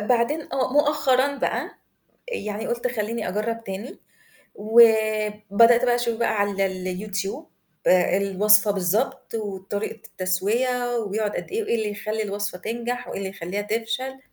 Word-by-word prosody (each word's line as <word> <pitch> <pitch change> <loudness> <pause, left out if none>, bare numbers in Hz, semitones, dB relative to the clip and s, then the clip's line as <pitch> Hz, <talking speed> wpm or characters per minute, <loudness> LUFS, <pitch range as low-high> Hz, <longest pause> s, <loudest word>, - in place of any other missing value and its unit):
بعدين 245 +8 0
آه 260 -1 0
مؤخرًا 280 -2 +2
بقى - - -1 0.6
يعني 215 - -4
قُلت: 235 +1 -2
"خلّيني 225 -2 -3
أجرب 230 +4 -2
تاني،" 195 +5 -7 0.6
وبدأت 215 +1 +4
بقى 245 -1 +3
أشوف 235 -2 -1
بقى 235 - +1
على 190 -1 -2
الYouTube 200 +8 -3 0.5
الوصفة 200 +3 +4
بالضبط، 205 +8 -1
وطريقة 205 0 -4
التسوية 240 +7 0
وبيقعد 210 -1 -1
قد - - -5
إيه، 445 +3 -1
وإيه - - 0
اللي 215 -2 -2
يخلّي 215 +2 -3
الوصفة 205 -2 -3
تنجح، 240 +4 -4
وإيه - - -5
اللي 195 -1 -3
يخلّيها 195 +2 -4
تفشل. 230 +5 -3
215 Hz, 130 wpm, -24 LUFS, 200-240 Hz, 0.6 s, وبدأت